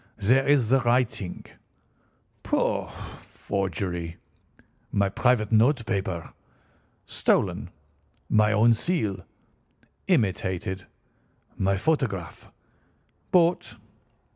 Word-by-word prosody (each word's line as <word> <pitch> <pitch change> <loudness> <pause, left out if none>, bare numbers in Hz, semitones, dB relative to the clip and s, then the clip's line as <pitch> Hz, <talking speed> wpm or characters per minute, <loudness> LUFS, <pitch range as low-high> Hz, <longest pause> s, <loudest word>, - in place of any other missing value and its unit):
"There 125 +6 +3
is 140 -5 +4
the 135 +1 +5
writing." 120 -6 -1 1.0
"Pooh, - - 0
pooh! - - -14 0.3
Forgery." 90 -3 -4 0.7
"My 100 -1 +1
private 110 +1 +1
note 115 +3 +3
paper." 95 -5 -3 0.7
"Stolen." - - 0 0.6
"My 105 0 +3
own 110 +2 +5
seal." 110 - -1 0.8
"Imitated." 95 -2 0 0.7
"My 95 0 +1
photograph." 105 - -2 0.8
"Bought." 175 -1 +2
105 Hz, 80 wpm, -26 LUFS, 95-125 Hz, 1.0 s, the